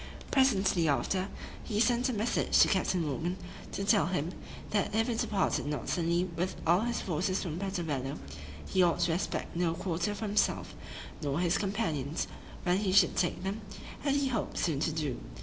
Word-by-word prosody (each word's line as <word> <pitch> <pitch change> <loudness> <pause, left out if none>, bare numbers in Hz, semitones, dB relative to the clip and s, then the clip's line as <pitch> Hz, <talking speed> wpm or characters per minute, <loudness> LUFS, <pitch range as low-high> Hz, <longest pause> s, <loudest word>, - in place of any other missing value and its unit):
Presently 195 - +3
after, 185 +6 +1 0.4
he 210 -3 -2
sent 245 +2 +3
a - - -1
message 220 +2 +1
to - - +7
Captain 185 -3 +1
Morgan, 165 +6 -2 0.3
to 195 - -3
tell 165 -5 +4
him, 175 -2 -1 0.4
"that 205 0 0
if 225 0 +2
he 240 - 0
departed 210 -8 0
not 150 0 -3
suddenly 170 0 +1
with 180 +3 -1
all 170 +2 +5
his 235 +2 -1
forces 185 +2 -1
from 170 -2 -4
Puerto 190 -2 -2
Bello, 135 -4 -2 0.5
he 190 - +2
ought 175 -1 +3
to 170 -1 +2
expect 175 0 -2
no 170 -1 +1
quarter 180 +3 -1
for 220 - -4
himself, 210 0 +1 0.5
nor 145 0 -1
his 175 0 +2
companions, 165 - -1 0.4
when 180 0 +2
he 200 -3 0
should 190 -2 +5
take 175 0 0
them, 200 +3 -3 0.4
as 280 -1 +2
he 280 -1 +1
hoped 230 -5 -2
soon 155 -5 +1
to 160 - +1
do." 150 -6 -2
185 Hz, 185 wpm, -31 LUFS, 165-205 Hz, 0.5 s, to